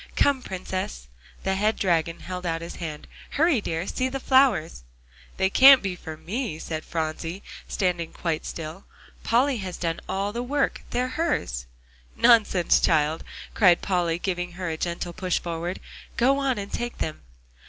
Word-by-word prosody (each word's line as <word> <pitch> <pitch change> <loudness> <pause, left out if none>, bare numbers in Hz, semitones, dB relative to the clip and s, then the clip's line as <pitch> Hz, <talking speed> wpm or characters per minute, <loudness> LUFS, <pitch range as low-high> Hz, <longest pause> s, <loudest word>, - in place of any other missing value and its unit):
"Come, 280 -2 +3
Princess." 185 - -5 0.4
The 190 - +1
head 210 +3 +1
dragon 165 -4 0
held 180 0 -6
out 165 -1 -2
his 170 - -7
hand. 155 -3 -6 0.3
"Hurry 310 -6 +4
dear! 165 -2 -2
See 255 +5 -1
the 270 +1 -4
flowers!" 255 - +3 0.6
"They 190 - +3
can't 265 +5 +8
be 190 -2 -2
for 160 -3 -8
me," 210 - -3
said 160 -1 -5
Phronsie, 165 +3 -4 0.2
standing 180 -4 -1
quite 165 -3 -2
still; 165 +3 -7 0.4
"Polly 255 +3 +2
has 190 -4 -5
done 165 -1 -2
all 200 +2 -1
the 235 - -2
work; 275 +3 0
they're 250 +1 0
hers." 255 - -1 0.5
"Nonsense, 220 -7 +5
child!" 155 0 +2 0.3
cried 180 -5 +5
Polly, 175 -3 +1
giving 180 -1 -3
her 180 0 -4
a - - -2
gentle 170 +1 -3
push 185 0 -1
forward. 170 +1 -4 0.4
"Go 270 +3 +4
on, 270 -3 0
and 200 0 -6
take 240 0 -3
them." 155 - -4
185 Hz, 160 wpm, -25 LUFS, 165-235 Hz, 0.6 s, can't